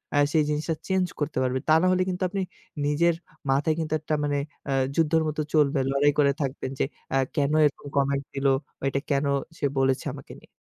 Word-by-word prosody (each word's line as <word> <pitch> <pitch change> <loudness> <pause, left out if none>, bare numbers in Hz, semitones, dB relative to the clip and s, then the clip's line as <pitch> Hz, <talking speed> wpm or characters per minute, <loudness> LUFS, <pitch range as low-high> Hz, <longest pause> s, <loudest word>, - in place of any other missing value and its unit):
আ - - +3 0.2
সেই 155 -2 +4
জিনিসটা 150 +2 -1
চেঞ্জ 190 -1 +2
করতে 150 -1 -2
পারবেন। 130 0 0
তা - - +7
নাহলে 185 0 +3
কিন্তু 180 0 -2
আপনি 195 +1 -2 0.4
নিজের 165 +3 +3 0.3
মাথায় 145 +4 +2
কিন্তু 155 -1 -2
একটা 155 +1 -3
মানে 145 -1 0 0.3
আ - - 0 0.2
যুদ্ধের 160 0 +3
মতো 155 0 -1
চলবে। 150 -2 +3
লড়াই 145 +1 +4
করে 140 -1 +5
থাকবেন 135 -1 -3
যে, - - +3 0.3
আ - - +4 0.2
কেনো 145 +1 +2
এরকম 145 0 -2
কমেন্ট 140 0 +1
দিলো, 135 0 +2 0.3
অ - - -13
এটা 140 - -1
কেনো 140 0 +1 0.3
সে 145 - -1
বলেছে 135 -1 +1
আমাকে - - -11
নিয়ে। - - -20
145 Hz, 200 wpm, -26 LUFS, 140-160 Hz, 0.4 s, তা